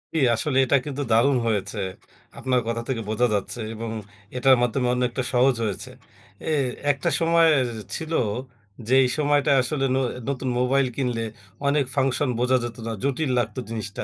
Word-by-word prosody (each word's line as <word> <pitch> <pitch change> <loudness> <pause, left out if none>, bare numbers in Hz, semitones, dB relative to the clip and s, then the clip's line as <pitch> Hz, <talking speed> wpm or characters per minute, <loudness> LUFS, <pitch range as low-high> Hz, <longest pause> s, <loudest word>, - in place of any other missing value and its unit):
জি, - - +2 0.2
আসলে 130 +4 -1
এটা 140 - +4
কিন্তু 145 -1 -4
দারুণ 125 +5 +4
হয়েছে। 105 -4 -1 0.6
আপনার 130 -1 +1
কথা 115 0 -1
থেকে 125 -4 -2
বোঝা 120 +3 +2
যাচ্ছে 105 +4 -2
এবং 115 0 -5 0.5
এটার 130 +1 +6
মাধ্যমে 120 +1 +1
অনেকটা 125 +1 -1
সহজ 125 +1 +4
হয়েছে। 105 -3 -3 0.6
এ - - +1 0.4
একটা 135 -1 -1
সময় 165 0 +4
এ - - +2 0.3
ছিল 160 -1 -4 0.7
যে, 125 - +1
এই 125 - +1
সময়টায় 145 -2 +3
আসলে 135 +2 -1
ন - - +2 0.3
নতুন 130 -1 -2
মোবাইল 130 +2 +2
কিনলে 125 -4 -1 0.4
অনেক 140 0 +2
ফাংশন 135 0 +1
বোঝা 125 +1 +3
যেত 120 0 -5
না, - - -2
জটিল 140 +1 0
লাগতো 115 +1 -2
জিনিসটা। 110 -3 -5
130 Hz, 165 wpm, -24 LUFS, 120-140 Hz, 0.7 s, এটার